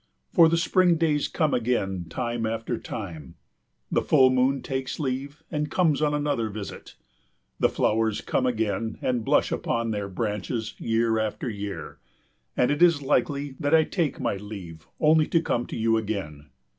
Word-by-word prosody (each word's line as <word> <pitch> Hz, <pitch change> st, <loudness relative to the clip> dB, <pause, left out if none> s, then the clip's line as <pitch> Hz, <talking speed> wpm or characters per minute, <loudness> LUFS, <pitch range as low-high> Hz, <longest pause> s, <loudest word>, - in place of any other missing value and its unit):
For 165 Hz, -3 st, +7 dB
the 170 Hz, -, +2 dB
spring 175 Hz, +1 st, +3 dB
days 155 Hz, -3 st, +1 dB
come 155 Hz, -4 st, 0 dB
again 100 Hz, -7 st, 0 dB
time 120 Hz, +2 st, -2 dB
after 115 Hz, +1 st, -3 dB
time; 85 Hz, -, -7 dB, 0.6 s
the -, -, +2 dB
full 130 Hz, -1 st, +5 dB
moon 130 Hz, +2 st, +2 dB
takes 130 Hz, -1 st, -3 dB
leave 140 Hz, +2 st, -3 dB
and 150 Hz, -2 st, -1 dB
comes 160 Hz, -6 st, +2 dB
on 150 Hz, -1 st, +2 dB
another 145 Hz, -7 st, 0 dB
visit, 100 Hz, -1 st, -8 dB, 0.6 s
the -, -, +4 dB
flowers 110 Hz, -1 st, +1 dB
come 130 Hz, -, 0 dB
again 110 Hz, -2 st, -1 dB
and 125 Hz, -3 st, 0 dB
blush -, -, +2 dB
upon 115 Hz, -1 st, -1 dB
their 100 Hz, -2 st, -3 dB
branches 110 Hz, +3 st, -3 dB
year 115 Hz, 0 st, +1 dB
after 110 Hz, +3 st, -2 dB
year, 100 Hz, -3 st, -6 dB, 0.6 s
and 125 Hz, -, +3 dB
it 145 Hz, +2 st, -1 dB
is 170 Hz, -5 st, +5 dB
likely 140 Hz, +1 st, 0 dB
that 145 Hz, 0 st, +3 dB
I 160 Hz, -, +6 dB
take 160 Hz, -4 st, -2 dB
my 100 Hz, -, -1 dB
leave 95 Hz, -6 st, -9 dB
only 155 Hz, 0 st, +4 dB
to 165 Hz, -, +3 dB
come 120 Hz, -7 st, -1 dB
to -, -, -5 dB
you 115 Hz, 0 st, +2 dB
again. 95 Hz, -10 st, -4 dB
120 Hz, 165 wpm, -26 LUFS, 110-145 Hz, 0.6 s, For